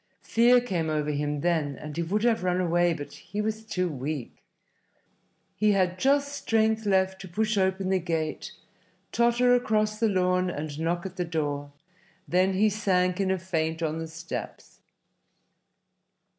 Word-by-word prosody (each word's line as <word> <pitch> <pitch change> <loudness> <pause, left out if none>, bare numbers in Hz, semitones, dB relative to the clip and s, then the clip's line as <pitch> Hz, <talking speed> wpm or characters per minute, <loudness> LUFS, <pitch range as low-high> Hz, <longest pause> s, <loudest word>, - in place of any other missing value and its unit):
Fear 240 +2 +4
came 175 -9 -2
over 150 -1 0
him 145 0 -2
then, 160 -5 0
and 150 -1 -8
he 170 - -1
would 200 +6 -1
have 230 -5 +2
run 180 0 +1
away, 175 -1 +2
but 145 -3 -5
he 205 - -7
was 220 +1 -2
too 185 -4 -1
weak. 145 -3 -5 1.2
He 215 -1 +3
had 185 -2 +1
just 280 +3 +2
strength 220 -4 +1
left 190 -1 +1
to 190 - -8
push 215 +5 -1
open 190 -1 +1
the 190 -1 +2
gate, 160 -3 -3 0.6
totter 240 +1 +3
across 215 -3 +1
the 225 -1 +3
lawn 180 -1 +1
and 150 -2 -5
knock 170 +3 -1
at 190 -1 -7
the 180 - 0
door; 145 -3 -3 0.6
then 185 +2 +2
he 205 +3 +3
sank 185 -3 +1
in 190 - 0
a 190 - +1
faint 165 -3 -2
on 160 0 -1
the 165 - -4
steps. 165 +1 -7
185 Hz, 160 wpm, -27 LUFS, 160-215 Hz, 1.2 s, Fear